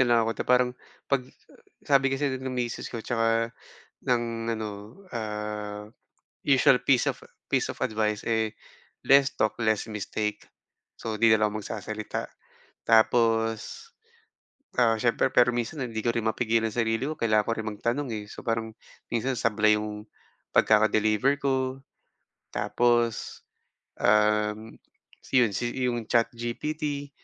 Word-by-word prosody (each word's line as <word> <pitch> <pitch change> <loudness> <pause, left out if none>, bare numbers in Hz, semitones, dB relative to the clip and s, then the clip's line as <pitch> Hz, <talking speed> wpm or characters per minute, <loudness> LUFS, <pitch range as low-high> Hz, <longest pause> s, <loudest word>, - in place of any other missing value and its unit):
na 130 - +5
lang 120 -1 +5
ako 115 - 0
na - - -1
parang 125 0 +4 0.3
'pag 140 -2 +1 0.6
sabi 135 -1 +4
kasi 135 +1 0
ng 130 - -4
misis 125 -2 -3
ko 115 -2 -6
tsaka 115 0 +1 0.5
ng 115 -2 0
ano, 110 -1 -3 0.4
ah, 105 - -5 0.5
usual 135 -2 +4
piece 130 -3 +3
of - - -2 0.3
piece - - +2
of - - -5
advice 105 -1 -1
eh, 110 -1 0 0.5
less 140 0 +6
talk 110 0 +2
less 110 -1 +1
mistake, 105 0 -3 0.6
so 110 -1 -5
'di 115 - +6
na 110 -1 +5
lang 105 - -2
ako 110 - -4
magsasalita. 105 +1 -5 0.5
Tapos, 115 - +2 0.9
ah, 115 -2 +4
siyempre 115 +3 +2
pero 125 -1 +4
minsan 120 +4 -3
hindi 115 -2 -4
ko 120 - -2
rin 115 - -1
mapigilan 115 0 +1
ang - - -7
sarili 115 +2 0
ko, 155 +2 -4
kailangan 110 -2 +3
ko 115 - -1
rin 110 -1 -3
magtanong, 120 +6 -2
eh, 105 - -6
so - - -9
parang 115 -1 -2 0.4
minsan 125 +2 0
sablay 110 -1 +3
'yong 105 0 -5 0.5
pagkaka-deliver 110 +4 +4
ko. 135 -1 -1 0.7
Tapos, 120 -1 0 0.6
um, 105 +1 +2 0.5
si 130 - +1
'yon 115 - +2
si 120 - -1 0.2
'yong 120 -2 -2
ChatGPT, 140 +5 -1
115 Hz, 140 wpm, -27 LUFS, 110-125 Hz, 0.9 s, less